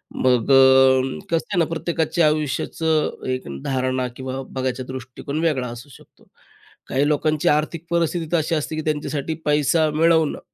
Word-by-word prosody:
मग 125 Hz, 0 st, +2 dB
अ, 130 Hz, 0 st, +5 dB
कसं 165 Hz, -, +1 dB
आहे -, -, 0 dB
ना 165 Hz, -, +3 dB
प्रत्येकाच्या 165 Hz, 0 st, 0 dB
आयुष्याचं 155 Hz, +2 st, -1 dB
एक 130 Hz, 0 st, -4 dB, 0.2 s
धारणा 130 Hz, -1 st, -1 dB
किंवा 130 Hz, 0 st, -5 dB
बघायचा 130 Hz, -1 st, -3 dB
दृष्टिकोन 130 Hz, +3 st, -6 dB
वेगळा 145 Hz, -7 st, 0 dB
असू 120 Hz, +4 st, -10 dB
शकतो. 135 Hz, -, -19 dB, 0.6 s
काही 140 Hz, +2 st, +1 dB
लोकांची 150 Hz, 0 st, 0 dB
आर्थिक 155 Hz, +2 st, 0 dB
परिस्थिती 170 Hz, 0 st, 0 dB
तर 170 Hz, -, +3 dB
अशी 160 Hz, +1 st, 0 dB
असते 155 Hz, +1 st, -3 dB
की 155 Hz, -, -2 dB
त्यांच्यासाठी 150 Hz, 0 st, -2 dB
पैसा 150 Hz, +2 st, +2 dB
मिळवणं 160 Hz, -1 st, +2 dB
150 Hz, 150 wpm, -22 LUFS, 130-160 Hz, 0.6 s, अ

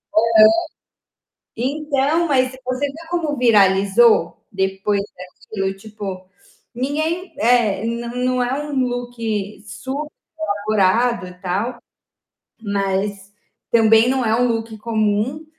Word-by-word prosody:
Aham. 225 Hz, +2 st, +3 dB, 1.2 s
Então, 290 Hz, +5 st, 0 dB
mas 255 Hz, -3 st, +2 dB
você 255 Hz, +3 st, -1 dB
vê 320 Hz, +4 st, -10 dB
como 325 Hz, -4 st, -1 dB
viralizou 200 Hz, -3 st, +4 dB
depois 195 Hz, +1 st, -1 dB
daquilo? 190 Hz, +2 st, -5 dB
Tipo, 195 Hz, -3 st, -8 dB, 0.5 s
ninguém 310 Hz, +9 st, -2 dB
é, 225 Hz, -4 st, +2 dB
não 235 Hz, +1 st, -4 dB
não 250 Hz, 0 st, 0 dB
é 245 Hz, +2 st, -1 dB
um 295 Hz, 0 st, -6 dB
look 245 Hz, 0 st, -4 dB, 1.3 s
superelaborado 205 Hz, +1 st, +1 dB
e 180 Hz, -, -12 dB
tal, 205 Hz, +7 st, -2 dB, 0.8 s
mas 200 Hz, -1 st, -2 dB, 0.4 s
também 225 Hz, 0 st, +5 dB
não 260 Hz, -1 st, 0 dB
é 220 Hz, 0 st, +2 dB
um 250 Hz, -, +3 dB
look 225 Hz, -1 st, -3 dB
comum, 220 Hz, +6 st, -1 dB
230 Hz, 105 wpm, -20 LUFS, 200-255 Hz, 1.3 s, também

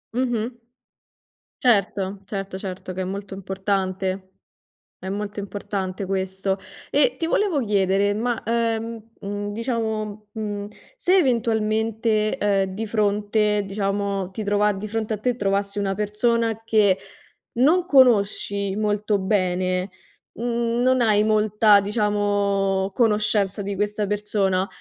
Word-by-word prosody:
Mh-mh. 240 Hz, -1 st, -1 dB, 1.0 s
Certo, 200 Hz, -4 st, +1 dB
certo, 195 Hz, -1 st, -5 dB
certo 185 Hz, -1 st, -6 dB
che 185 Hz, -, -4 dB
è -, -, 0 dB
molto 195 Hz, +1 st, -5 dB
importante. 190 Hz, 0 st, -2 dB, 0.7 s
È 190 Hz, -, -7 dB
molto 205 Hz, +1 st, -4 dB
importante 200 Hz, -1 st, -4 dB
questo. 190 Hz, 0 st, -1 dB, 0.3 s
E -, -, +3 dB
ti 330 Hz, -, -1 dB
volevo 335 Hz, -6 st, +1 dB
chiedere, 200 Hz, -1 st, +2 dB
ma, 235 Hz, +2 st, -1 dB
uhm, 230 Hz, -1 st, -1 dB, 0.2 s
mhmm, 205 Hz, +1 st, -4 dB
diciamo, 220 Hz, -3 st, -3 dB
mhmm, 205 Hz, -2 st, -4 dB, 0.3 s
se 380 Hz, -5 st, +3 dB
eventualmente, 220 Hz, -, +1 dB
uhm, 195 Hz, -2 st, +1 dB
di 220 Hz, +2 st, -4 dB
fronte, 210 Hz, 0 st, +1 dB
diciamo, 195 Hz, -1 st, -2 dB
ti 215 Hz, -, -5 dB
trova 205 Hz, 0 st, +2 dB
di 205 Hz, +1 st, -5 dB
fronte 220 Hz, 0 st, -2 dB
a 215 Hz, -, -2 dB
te 245 Hz, +3 st, 0 dB
trovassi 200 Hz, -1 st, -1 dB
una 195 Hz, -1 st, 0 dB
persona 225 Hz, +2 st, 0 dB
che 210 Hz, -4 st, +3 dB, 0.6 s
non 340 Hz, +7 st, +4 dB
conosci 200 Hz, -, +3 dB
molto 210 Hz, -1 st, 0 dB
bene, 185 Hz, -1 st, 0 dB, 0.4 s
mhmm, 235 Hz, +1 st, -1 dB
non 255 Hz, 0 st, +3 dB
hai 210 Hz, -2 st, +4 dB
molta, 215 Hz, -1 st, +4 dB
diciamo 200 Hz, -2 st, 0 dB
conoscenza 210 Hz, -3 st, +2 dB
di 200 Hz, 0 st, -3 dB
questa 210 Hz, +1 st, -1 dB
persona, 195 Hz, -2 st, 0 dB
205 Hz, 120 wpm, -23 LUFS, 195-220 Hz, 1.0 s, non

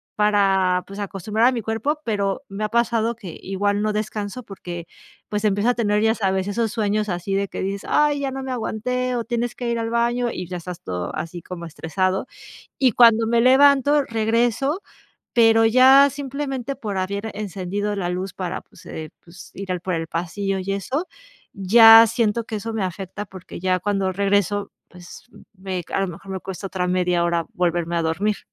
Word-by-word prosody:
para, 195 Hz, -3 st, +2 dB
pues, 200 Hz, +1 st, -9 dB
acostumbrar 205 Hz, +3 st, 0 dB
a 260 Hz, -, +4 dB
mi 235 Hz, -, -2 dB
cuerpo. 230 Hz, +8 st, -2 dB
Pero, 200 Hz, +2 st, -1 dB
me 205 Hz, +2 st, -3 dB
ha -, -, -3 dB
pasado 235 Hz, 0 st, +1 dB
que 190 Hz, -8 st, -9 dB
igual 205 Hz, +2 st, -1 dB
no 215 Hz, 0 st, 0 dB
descanso 215 Hz, +2 st, -4 dB
porque, 175 Hz, -4 st, -8 dB, 0.4 s
pues, 210 Hz, 0 st, -2 dB
empieza 205 Hz, +3 st, +2 dB
a -, -, -1 dB
tener, 210 Hz, -2 st, +1 dB
ya 220 Hz, 0 st, +3 dB
sabes, 190 Hz, -2 st, 0 dB
esos 225 Hz, +1 st, -1 dB
sueños 215 Hz, -1 st, 0 dB
así 175 Hz, +2 st, -2 dB
de 200 Hz, 0 st, 0 dB
que -, -, -5 dB
dices: 195 Hz, +1 st, -4 dB
"¡Ay!, 295 Hz, -1 st, +2 dB
ya 270 Hz, -1 st, -2 dB
no 265 Hz, 0 st, -5 dB
me 260 Hz, -, -4 dB
aguanté 250 Hz, +2 st, -2 dB
o 235 Hz, -, -1 dB
tienes 240 Hz, 0 st, -2 dB
que 245 Hz, -2 st, -4 dB
ir 235 Hz, 0 st, -1 dB
al 225 Hz, 0 st, -2 dB
baño", 240 Hz, +1 st, +1 dB
y 180 Hz, -, -6 dB
ya 180 Hz, -, -4 dB
estás 175 Hz, 0 st, -8 dB
todo 90 Hz, -1 st, -4 dB
así 170 Hz, +1 st, -5 dB
como 170 Hz, 0 st, -8 dB
estresado. 185 Hz, -, -2 dB, 0.5 s
Y 255 Hz, -4 st, +4 dB
cuando 230 Hz, -1 st, +6 dB
me 235 Hz, 0 st, +2 dB
levanto, 280 Hz, +3 st, +5 dB
regreso, 235 Hz, -, 0 dB, 0.5 s
pero, 225 Hz, -1 st, +5 dB
ya 265 Hz, +4 st, +7 dB
simplemente 275 Hz, -1 st, -4 dB
por 210 Hz, -6 st, -5 dB
haber 200 Hz, +3 st, -2 dB
encendido 205 Hz, 0 st, -3 dB
la 180 Hz, -3 st, -2 dB
luz 185 Hz, +2 st, -4 dB
para 185 Hz, -1 st, -4 dB
pues, -, -, -19 dB
eh, 155 Hz, -1 st, -7 dB
pues, 180 Hz, +2 st, -14 dB
ir 195 Hz, -1 st, -5 dB
al 180 Hz, -, -1 dB
por 185 Hz, -1 st, -3 dB
el 165 Hz, 0 st, -3 dB
pasillo 190 Hz, +4 st, -2 dB
y 195 Hz, +1 st, -2 dB
eso 265 Hz, -, -3 dB, 0.5 s
ya 225 Hz, +3 st, +8 dB
siento 230 Hz, 0 st, 0 dB
que 220 Hz, -, -5 dB
eso 225 Hz, +2 st, -5 dB
me 215 Hz, -3 st, -1 dB
afecta 190 Hz, +2 st, -5 dB
porque 185 Hz, -3 st, -10 dB
ya 185 Hz, 0 st, +1 dB
cuando 195 Hz, -1 st, 0 dB
regreso, 200 Hz, +1 st, 0 dB, 0.2 s
pues, 180 Hz, -1 st, -13 dB
mm, -, -, -16 dB, 0.2 s
me 185 Hz, -2 st, -3 dB
a -, -, +1 dB
lo 195 Hz, -, 0 dB
mejor 180 Hz, +3 st, -9 dB
me 190 Hz, -, -3 dB
cuesta 190 Hz, +1 st, -7 dB
otra 185 Hz, -1 st, -2 dB
media 180 Hz, -1 st, +1 dB
hora 170 Hz, -1 st, 0 dB
volverme 175 Hz, -1 st, 0 dB
a 170 Hz, -, +1 dB
dormir. 195 Hz, +6 st, 0 dB
205 Hz, 195 wpm, -22 LUFS, 185-235 Hz, 0.5 s, ya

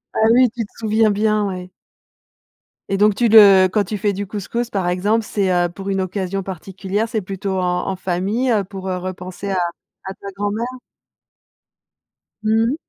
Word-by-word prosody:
Ah 220 Hz, -, +3 dB
oui, 250 Hz, 0 st, +5 dB
tu 235 Hz, 0 st, -3 dB
te -, -, -20 dB
souviens 220 Hz, 0 st, +2 dB
bien, 210 Hz, 0 st, +1 dB
ouais. 185 Hz, -1 st, -6 dB, 1.2 s
Et 195 Hz, -, 0 dB
donc 210 Hz, 0 st, +4 dB
tu 235 Hz, +2 st, +2 dB
le 200 Hz, -4 st, +8 dB
quand 205 Hz, +1 st, +1 dB
tu 210 Hz, +3 st, -4 dB
fais 205 Hz, +1 st, 0 dB
du 200 Hz, +1 st, -4 dB
couscous, 220 Hz, +4 st, -3 dB
par 190 Hz, -6 st, -1 dB
exemple, 205 Hz, +6 st, +1 dB
c'est, 195 Hz, -4 st, 0 dB
heu, 175 Hz, -1 st, +2 dB
pour 195 Hz, +3 st, -7 dB
une 195 Hz, -1 st, 0 dB
occasion 190 Hz, +1 st, -3 dB
particulière? 195 Hz, +3 st, -3 dB
C'est 220 Hz, -1 st, -2 dB
plutôt 190 Hz, 0 st, -4 dB
en 180 Hz, -1 st, -1 dB
en 195 Hz, -, -1 dB
famille, 190 Hz, +8 st, -1 dB
heu, 210 Hz, -3 st, +2 dB
pour 190 Hz, 0 st, -9 dB
repenser 185 Hz, +1 st, -5 dB
à 190 Hz, -, 0 dB, 0.5 s
à 190 Hz, -, -5 dB
ta 200 Hz, -, -11 dB
grand-mère? 205 Hz, +4 st, -2 dB, 1.7 s
Mmh 220 Hz, +1 st, +2 dB
mh. -, -, -2 dB
200 Hz, 175 wpm, -20 LUFS, 185-215 Hz, 1.7 s, le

